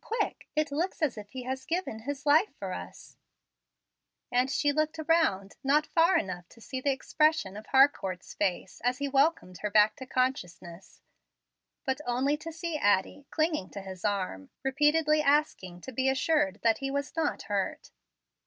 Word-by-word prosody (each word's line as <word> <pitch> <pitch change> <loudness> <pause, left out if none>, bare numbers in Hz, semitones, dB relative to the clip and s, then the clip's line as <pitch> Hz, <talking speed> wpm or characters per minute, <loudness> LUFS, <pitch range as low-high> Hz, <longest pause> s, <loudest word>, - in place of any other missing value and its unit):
Quick. 450 -1 -3
It 305 -1 +1
looks 335 +3 -2
as 285 -6 +1
if 210 -2 -9
he 260 +1 -7
had 260 +1 -5
given 340 -10 -2
his 280 +4 -5
life 310 +8 +4
for - - -5
us"; - - -9 1.1
and 250 +2 +2
she 290 +1 +2
looked 310 +2 0
around, 315 - +1
not 295 +3 +3
far 340 +3 +4
enough 180 - -4
to - - -18
see 260 +3 -6
the 280 - +1
expression 305 -5 +1
of 215 +1 -9
Harcourt's 240 -10 +2
face 190 -2 -2
as 250 +1 +1
he 285 0 -2
welcomed 275 - +1
her 210 - -2
back 210 +1 +5
to 260 - -8
consciousness, 190 -9 -3 0.8
but 265 +1 -1
only 260 +4 +1
to 325 +2 -7
see 330 0 -3
Addie 205 +7 +1
clinging 310 - 0
to 200 - -7
his 190 -2 -9
arm, 185 - -2
repeatedly 300 +3 +3
asking 280 - +1
to 260 - -8
be 260 +2 +1
assured 265 - +1
that 225 -1 +3
he 270 - -2
was 280 +2 -3
not 320 -2 -1
hurt. 200 -2 -3
270 Hz, 170 wpm, -29 LUFS, 205-305 Hz, 1.1 s, back